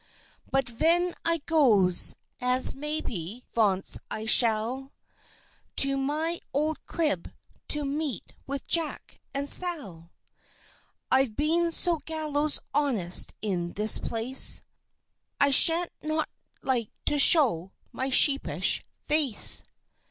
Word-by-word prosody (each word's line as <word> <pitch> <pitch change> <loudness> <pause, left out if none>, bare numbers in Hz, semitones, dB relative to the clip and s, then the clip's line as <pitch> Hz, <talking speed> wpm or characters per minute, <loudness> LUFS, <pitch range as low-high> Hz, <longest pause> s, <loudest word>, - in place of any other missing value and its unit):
"But 270 0 -1
ven 335 +9 0
I 335 -1 0
goes, 215 - +3 0.3
as 250 +1 +3
maybe 250 - -5
vonce 200 -4 +2
I 220 - -6
shall, 235 +4 +2 0.8
To 275 0 +2
my 305 +5 -2 0.2
old 305 +2 -2
Crib 300 - -2 0.4
to 295 -1 +1
meet 285 -1 -5
with 275 0 -5
Jack, 330 -3 -2
and 280 +1 -3
Sal, 220 - 0 1.0
I've 260 -4 +1
been 335 +4 0
so 340 0 +1
gallows 305 -2 -1
honest 240 -12 0
in 175 -4 -3
this 210 +2 +2
Place, 235 +4 +1 0.8
I 285 0 +3
shan't 330 +5 +5
not 310 +1 -2 0.4
like 245 -5 -1 0.2
to 295 - 0
show 230 - +5 0.2
my 260 +1 -4
sheepish 275 +1 +3 0.2
Face. 295 -8 +1
275 Hz, 105 wpm, -26 LUFS, 225-310 Hz, 1.0 s, shan't